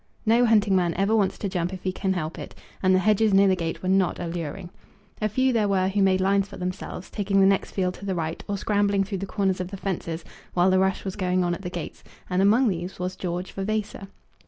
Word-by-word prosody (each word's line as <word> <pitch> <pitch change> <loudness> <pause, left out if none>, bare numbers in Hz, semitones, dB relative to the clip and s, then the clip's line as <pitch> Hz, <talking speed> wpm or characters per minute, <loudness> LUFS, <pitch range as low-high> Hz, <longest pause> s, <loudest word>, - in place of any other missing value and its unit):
No 235 +2 +4
hunting 210 -3 +4
man 175 -3 +1
ever 200 +4 +2
wants 195 -3 +1
to 205 - -3
jump 180 -2 -2
if 185 -1 -8
he 185 - 0
can 190 +1 -1
help 160 -3 -4
it, - - -8 0.3
and 185 0 +4
the 185 - +1
hedges 215 -1 +4
near 195 +1 +6
the 190 - +4
gate 165 -1 -4
were - - -2
not 190 -1 +2
alluring. 170 +1 -5 0.5
A 215 - +1
few 260 +4 +2
there 215 -3 +2
were 190 -1 +2
who 200 +1 0
made 190 -1 +3
lines 195 +1 +2
for 200 - -10
themselves, 180 0 -5
taking 200 -1 +1
the 195 - +6
next 195 0 +2
field 185 -2 -1
to 200 - -10
the 190 -2 -1
right, 160 -1 -3
or 205 - -2
scrambling 200 -1 +1
through 195 -1 -4
the 195 - -4
corners 190 -2 0
of 180 - -4
the 195 +2 -7
fences 170 -4 -4 0.3
while 180 +1 +4
the 185 - +4
rush 190 +1 0
was 190 - -4
going 185 -2 +1
on 175 0 0
at 175 - -5
the 180 - -4
gates; 175 -2 -7 0.3
and 180 +1 +2
among 220 +6 +4
these 180 -2 -3
was 180 +1 -3
George 180 0 -4
Vavasor. 200 0 -3
190 Hz, 250 wpm, -25 LUFS, 180-200 Hz, 0.5 s, near